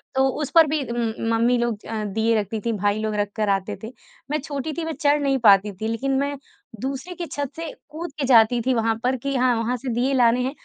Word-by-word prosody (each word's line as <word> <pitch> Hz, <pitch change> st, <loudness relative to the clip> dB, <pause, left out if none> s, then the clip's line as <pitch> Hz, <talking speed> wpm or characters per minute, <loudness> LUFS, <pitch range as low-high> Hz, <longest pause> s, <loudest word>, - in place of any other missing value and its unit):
तो 265 Hz, 0 st, +4 dB
उस 290 Hz, -, -2 dB
पर 325 Hz, -2 st, +8 dB
भी 305 Hz, 0 st, 0 dB
उम, 235 Hz, -2 st, -1 dB, 0.2 s
मम्मी 235 Hz, +2 st, +3 dB
लोग 235 Hz, -3 st, -2 dB
अ, 220 Hz, -1 st, -3 dB
दीये 220 Hz, +3 st, +1 dB
रखती 210 Hz, +2 st, -3 dB
थी, 235 Hz, -, +1 dB
भाई 205 Hz, +1 st, 0 dB
लोग 215 Hz, -1 st, -2 dB
रख 205 Hz, 0 st, -1 dB
कर 215 Hz, -2 st, 0 dB
आते 195 Hz, -1 st, 0 dB
थे। 220 Hz, -, -4 dB, 0.4 s
मैं 305 Hz, -, +1 dB
छोटी 290 Hz, +1 st, -4 dB
थी 335 Hz, -, -2 dB
मैं 325 Hz, -, -3 dB
चढ़ 290 Hz, 0 st, +3 dB
नहीं 275 Hz, -1 st, +2 dB
पाती 200 Hz, 0 st, +6 dB
थी 220 Hz, -, -1 dB
लेकिन 245 Hz, +5 st, -1 dB
मैं 280 Hz, 0 st, -2 dB, 0.4 s
दूसरे 275 Hz, +7 st, -4 dB
की 345 Hz, -, -4 dB
छत 285 Hz, -4 st, -4 dB
से 330 Hz, -1 st, -5 dB, 0.2 s
कूद 330 Hz, +2 st, -6 dB
के 280 Hz, -, 0 dB
जाती 240 Hz, -1 st, +5 dB
थी 260 Hz, -, +2 dB
वहाँ 225 Hz, -1 st, +1 dB
पर 255 Hz, +1 st, +2 dB
कि 275 Hz, 0 st, -1 dB
हाँ, 250 Hz, -1 st, +3 dB
वहाँ 230 Hz, +2 st, -1 dB
से 255 Hz, +2 st, -6 dB
दीये 250 Hz, +4 st, +1 dB
लाने 245 Hz, -1 st, +4 dB
हैं 260 Hz, -, -1 dB
245 Hz, 250 wpm, -23 LUFS, 220-280 Hz, 0.4 s, पर